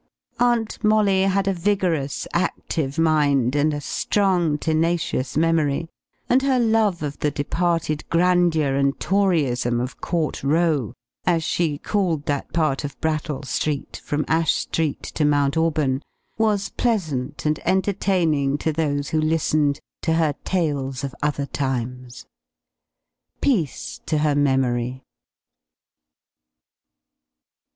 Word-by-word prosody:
Aunt 235 -2 +1
Molly 210 -3 +3
had 195 0 +1
a 195 - +2
vigorous, 175 -6 -1
active 160 -4 -1
mind, 145 -5 +2
and 150 +1 +2
a 145 - -3
strong, 175 0 +1
tenacious 160 -4 0
memory; 165 -1 +1 0.4
and 255 +2 +4
her 265 -2 +2
love 220 -7 +2
of 145 -1 -4
the 150 - +1
departed 160 +1 -1
grandeur 170 -4 +3
and 140 0 +1
Toryism 145 -12 +1
of 125 +1 -5
Court 165 -6 -2
Row, 150 - +1 0.3
as 170 -2 +2
she 160 -3 0
called 170 -5 -1
that 145 -1 -2
part 155 -4 0
of 145 -1 -6
Brattle 155 -2 -2
Street 140 +2 -3
from 150 +1 -1
Ash 160 0 +2
Street 160 -3 -2
to 155 - -2
Mount 145 -1 +2
Auburn, 155 -5 +1 0.3
was 210 -3 +1
pleasant 155 - -2
and 155 0 +1
entertaining 180 -7 +1
to 160 +1 -1
those 145 -2 -1
who 155 - +1
listened 155 -2 +1 0.2
to 160 - +1
her 160 -2 +2
tales 140 -8 -1
of 135 -2 -4
other 145 -1 0
times. 125 -2 -4 1.1
Peace 190 - -1
to 155 - +1
her 150 -1 +2
memory! 130 -3 0
155 Hz, 120 wpm, -22 LUFS, 140-175 Hz, 1.1 s, and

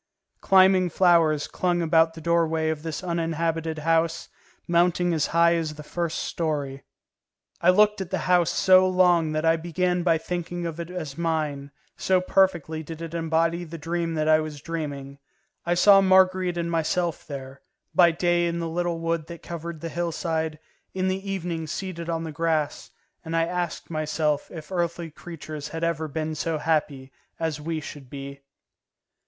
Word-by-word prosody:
Climbing 190 -1 +5
flowers 165 -4 +3
clung 175 -1 0
about 165 0 +3
the 165 - -9
doorway 165 -1 +1
of 155 -1 -2
this 160 +3 -5
uninhabited 165 -2 -1
house, 165 +1 0 0.4
mounting 175 0 +2
as 155 -3 +1
high 170 +1 +4
as 160 -2 -2
the 150 - -9
first 170 +1 -3
story. 145 -4 -3 0.8
I 170 - +4
looked 210 +2 +4
at 185 - -5
the 190 - -1
house 180 -2 +3
so 185 -1 +5
long 175 -3 +3
that 155 +1 -1
I 165 0 +4
began 180 +2 -1
by 170 -2 +3
thinking 175 +1 -4
of 165 0 -5
it 170 0 -5
as 165 -5 -6
mine, 155 -4 -1 0.3
so 185 -1 +2
perfectly 180 -4 +1
did 160 +1 -8
it 165 -1 -7
embody 165 +1 0
the 165 0 -8
dream 165 +1 -2
that 155 0 0
I 155 0 +5
was 155 -2 -5
dreaming; 140 -3 -5 0.5
I 175 - +2
saw 195 +2 +7
Marguerite 185 -1 +3
and 170 0 -2
myself 165 +1 -1
there, 135 -1 -8 0.3
by 175 -2 +6
day 175 +1 +1
in 170 0 -2
the 170 -1 -2
little 170 +1 -1
wood 165 -1 -2
that 170 -1 -10
covered 170 -1 -6
the 165 - -4
hillside, 160 -1 -2 0.4
in 185 0 0
the 195 +1 -3
evening 170 -4 -3
seated 170 0 -5
on 165 -1 -1
the 160 - -5
grass, 155 -1 -1 0.3
and 165 0 -4
I 165 - +3
asked 175 -1 -4
myself 155 -1 -1
if 160 0 -10
earthly 170 -2 -2
creatures 155 -2 -8
had 165 +2 -6
ever 165 -1 -1
been 155 +1 -3
so 160 +1 -2
happy 150 -4 -1 0.3
as 160 -2 -2
we 160 +1 -3
should 145 -3 -10
be. 140 0 -8
165 Hz, 170 wpm, -25 LUFS, 155-175 Hz, 0.8 s, saw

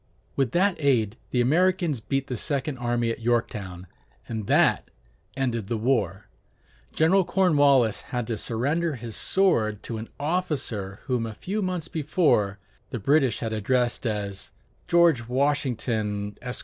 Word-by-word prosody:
With 135 -3 +1
that 190 +1 +2
aid, 120 -8 +2
the 125 - +1
Americans 170 +1 +2
beat 135 +5 -2
the 130 - -4
second 135 +2 -2
army 120 -1 0
at - - -5
Yorktown, 105 -6 -2 0.4
and 110 -3 -4
that - - +3 0.5
ended 120 -6 -1
the 115 - -1
war. 105 -5 0 0.6
General 185 +5 +3
Cornwallis 145 - +3
had 120 -2 -2
to 115 - -2
surrender 145 +7 -1
his 115 -2 -7
sword 110 - +1
to 115 -2 -5
an 110 - -7
officer 145 - -2
whom 125 -4 -1
a 110 - -7
few 205 - -3
months 180 -4 -2
before 145 - +1 0.3
the - - -4
British 135 +3 +2
had 115 -2 -2
addressed 120 +3 0
as 100 -2 -4 0.4
"George 170 -9 +4
Washington, 120 -6 -1
Esq. 125 0 -4
125 Hz, 140 wpm, -25 LUFS, 110-150 Hz, 0.6 s, George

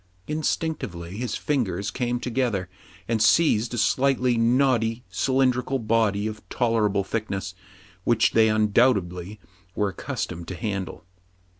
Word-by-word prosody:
Instinctively 150 - -3
his 120 -1 -3
fingers 105 -9 -1
came 120 -1 -1
together, 120 -7 -1 0.4
and 115 -2 0
seized 115 0 +3
a - - -4
slightly 130 +1 +2
knotty, 115 -1 +2
cylindrical 130 +4 +1
body, 110 -3 +1
of 110 -1 -4
tol 120 -2 0
erable 105 -3 +1
thickness, 100 -4 -3 0.5
which 115 +1 +3
they 110 -1 +4
undoubtedly 105 -3 +1 0.4
were 105 -1 +1
accustomed 85 -2 -5
to 95 - -5
handle. 100 +1 -4
115 Hz, 120 wpm, -25 LUFS, 100-125 Hz, 0.5 s, they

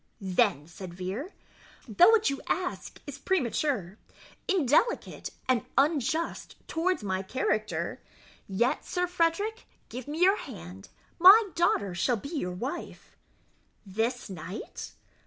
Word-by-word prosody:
"Then," 190 - +1
said 175 0 -9
Vere, 195 - -4 0.6
"though 295 - +6
what 450 -9 +4
you 275 - -4
ask 360 0 -3
is 285 -1 -8
premature, 255 - -1 0.5
indelicate, 380 - +1 0.2
and 255 -4 +2
unjust 310 +3 0
towards 345 - 0
my 190 -2 -1
character, 215 0 -2 0.5
yet, 225 +6 +1
Sir 360 -1 -1
Frederick, 360 +6 0 0.2
give 255 +1 -7
me 305 +3 -4
your 385 +3 +5
hand 90 +3 -9 0.3
my 395 +3 +8
daughter 205 - +1
shall 230 +8 +1
be 280 - -8
your 180 -11 -1
wife." 255 - -6 0.7
"This 225 +6 -2
night?" 190 +1 -7
260 Hz, 120 wpm, -28 LUFS, -, 0.7 s, my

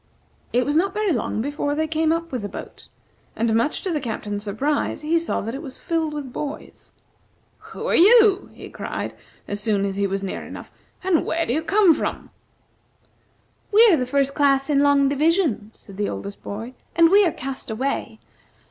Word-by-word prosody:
It 245 +1 +2
was 290 - 0
not 380 +4 +1
very 425 -2 +1
long 230 -4 -1
before 290 +1 -2
they 315 +1 0
came 315 0 +1
up 335 0 -2
with 250 -4 -3
the 205 - -5
boat; - - -10 0.5
and, 225 0 0
much 230 +7 0
to 380 - -2
the 310 - 0
Captain's 205 -4 -4
surprise, 265 +12 -1
he 320 +2 +1
saw 335 - -2
that 225 +3 -5
it 270 - -5
was 275 -5 -8
filled 320 -2 -2
with 275 -4 -6
boys. 295 0 -7 0.7
"Who - - -9
are - - +2
you?" 415 0 +6
he - - -11
cried - - -5 0.3
as 205 - -4
soon 205 -2 0
as 195 0 -3
he 200 0 +1
was 195 0 -3
near 195 - -4
enough. - - -10 0.3
"And 365 -4 +2
where 330 +1 -1
do 240 - -1
you 310 - 0
come 390 0 +4
from?" - - -4 1.4
"We 445 +3 +7
are - - +6
the 250 - -2
First 275 +1 +1
Class 280 0 +2
in 280 - +3
Long 285 -1 +4
Division," 290 - +1
said 195 -2 -15
the 205 0 -1
oldest 200 0 -7
boy, 225 +5 -6 0.2
"and 335 0 +5
we 405 +1 +7
are 350 - +2
cast 270 -3 -6
away. 260 +6 -3
285 Hz, 195 wpm, -22 LUFS, 230-330 Hz, 1.4 s, We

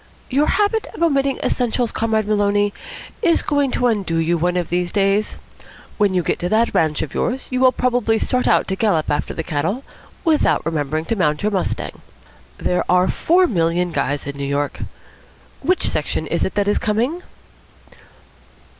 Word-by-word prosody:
"Your 285 +4 +2
habit 420 +2 +1
of - - -2
omitting 275 -4 +2
essentials, 245 -1 0
Comrade 220 -2 0
Maloney, 205 -1 +2 0.5
is 340 -6 +3
going 285 -2 +1
to 250 - 0
undo 200 -8 0
you 165 +1 +1
one 175 +2 0
of 175 -2 -2
these 175 0 -1
days. 200 +1 +1 0.6
When 200 -3 +2
you 180 - +2
get - - -1
to 175 - -2
that 225 +3 +2
ranch 155 -2 +1
of 145 - -7
yours, 260 +2 -2
you 255 - 0
will 255 0 +6
probably 245 -2 +1
start 250 +3 0
out - - +3
to 190 - 0
gallop 190 -8 +1
after 145 - -2
the 160 - -3
cattle 175 - -2 0.4
without 315 - +2
remembering 155 -1 -1
to 230 - -1
mount 150 -5 0
your 210 - +1
mustang. 190 -3 -3 0.6
There 180 - 0
are 180 +1 +4
four 360 +3 +3
million 175 - 0
guys 145 -2 -1
in 140 0 -6
New 140 - -4
York. 145 +1 -2 0.8
Which 370 +1 +1
section 155 +1 -2
is 170 +2 -1
it - - -2
that 200 0 +1
is 205 - +2
coming?" 240 +11 -1
205 Hz, 175 wpm, -20 LUFS, 165-250 Hz, 0.8 s, will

